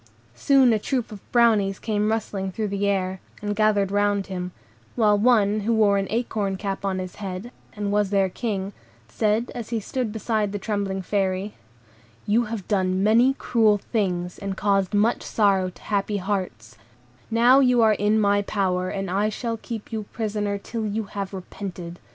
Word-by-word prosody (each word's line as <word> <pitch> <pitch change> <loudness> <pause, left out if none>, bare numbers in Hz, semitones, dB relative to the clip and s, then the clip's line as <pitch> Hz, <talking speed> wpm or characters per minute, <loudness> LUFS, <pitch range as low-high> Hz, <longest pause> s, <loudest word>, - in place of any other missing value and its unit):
Soon 260 - +4
a 215 - +1
troop 250 +1 -2
of 205 -2 -12
Brownies 215 -5 +3
came 210 -1 -1
rustling 200 -3 -2
through 215 +2 -3
the 200 0 -1
air, 190 -1 -1 0.2
and 205 0 -3
gathered 205 -2 +2
round 205 -1 +1
him, 180 -1 -5 0.4
while 215 -3 +4
one 210 -2 +3
who 225 +3 0
wore 205 -2 +4
an 195 - -2
acorn 215 -4 -1
cup 195 0 -4
on 195 -1 -1
his 185 -1 -6
head, 195 +3 -6 0.2
and 205 -1 -2
was 205 -1 +2
their 195 -1 +2
King, 200 0 -3 0.3
said, 215 - 0
as 235 -3 -6
he 230 -1 -1
stood 235 +2 -3
beside 215 -2 -1
the - - -1
trembling 200 -2 -2
Fairy,— 195 +1 -1 0.7
"You 230 +3 +2
have 215 -4 -6
done 190 -2 +1
many 235 +6 +4
cruel 220 -6 +3
things, 180 -5 -2
and 195 -2 -4
caused 195 -1 +1
much 220 +4 +2
sorrow 195 -4 +2
to - - -17
happy 205 0 -1
hearts; 180 - -4 0.5
now 240 +4 +5
you 250 -3 +4
are 220 -1 +5
in 210 +2 +2
my 205 -1 +3
power, 185 -3 -1
and 195 0 -3
I 200 +4 +1
shall 230 +1 -3
keep 225 -1 -7
you 220 -2 -3
prisoner 210 -2 -2
till 225 +3 -5
you 215 +2 -2
have 200 -1 -4
repented. 180 -2 -7
205 Hz, 175 wpm, -24 LUFS, 195-220 Hz, 0.7 s, now